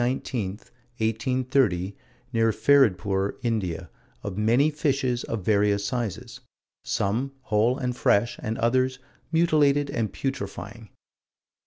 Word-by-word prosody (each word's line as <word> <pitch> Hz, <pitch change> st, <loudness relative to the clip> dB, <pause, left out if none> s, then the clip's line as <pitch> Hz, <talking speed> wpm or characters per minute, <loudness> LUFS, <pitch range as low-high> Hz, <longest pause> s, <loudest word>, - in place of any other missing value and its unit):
19, 120 Hz, -4 st, -1 dB, 0.5 s
1830, 110 Hz, -4 st, 0 dB, 0.4 s
near 115 Hz, -1 st, +3 dB
Feridpoor, 100 Hz, -7 st, +3 dB
India, 95 Hz, -7 st, -2 dB, 0.4 s
of 100 Hz, -, -4 dB
many 120 Hz, +9 st, +3 dB
fishes, 135 Hz, -5 st, 0 dB
of 115 Hz, -4 st, -4 dB
various 100 Hz, -1 st, +2 dB
sizes 120 Hz, -4 st, -4 dB, 0.4 s
some 120 Hz, +8 st, -1 dB
whole 120 Hz, 0 st, +2 dB
and 125 Hz, -3 st, -2 dB
fresh 120 Hz, 0 st, +2 dB
and 110 Hz, -2 st, -3 dB
others 130 Hz, +2 st, +1 dB, 0.3 s
"mutilated 150 Hz, -4 st, +3 dB
and 110 Hz, -4 st, -1 dB
putrefying." 115 Hz, -5 st, -5 dB
115 Hz, 105 wpm, -25 LUFS, 105-130 Hz, 0.5 s, near